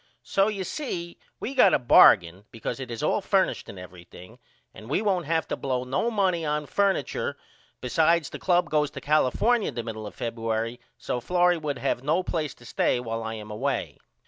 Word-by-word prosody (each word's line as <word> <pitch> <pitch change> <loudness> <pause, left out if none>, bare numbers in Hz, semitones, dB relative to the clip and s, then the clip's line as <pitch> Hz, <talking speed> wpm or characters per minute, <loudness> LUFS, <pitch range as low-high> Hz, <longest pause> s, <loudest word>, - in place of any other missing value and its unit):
So 195 +1 +2
you 205 -3 -2
see 175 - -5 0.2
we 260 - -4
got 225 -8 +5
a - - +4
bargain 95 -6 +5
ecause 115 +3 -5
it 130 -2 -6
is 115 -1 -5
all - - +1
furnished - - 0
and 100 - -9
everything 90 0 -13 0.3
and 110 - -12
we 145 - +1
won't 190 -6 0
have 160 0 0
to - - -1
blow 130 -2 -2
no 130 - -1
noney 190 -6 +1
on 150 0 -1
furniture 195 -4 -1 0.4
besides 160 +4 +2
the - - -7
club 180 -1 +1
goes 150 -1 +2
to - - -8
California 155 - +2
the 120 -2 -5
middle 110 -2 -6
of - - -12
Febuery 115 0 -3 0.2
so 125 - -3
Florrie 175 +5 +2
would 150 -2 -3
not - - -11
have 125 - 0
no 160 +6 +1
place 155 -4 -3
to 120 - -17
stay 120 - +1
while 115 -2 -4
I 110 0 -4
am 105 -1 -9
away. 105 - -3
145 Hz, 200 wpm, -26 LUFS, 115-175 Hz, 0.4 s, got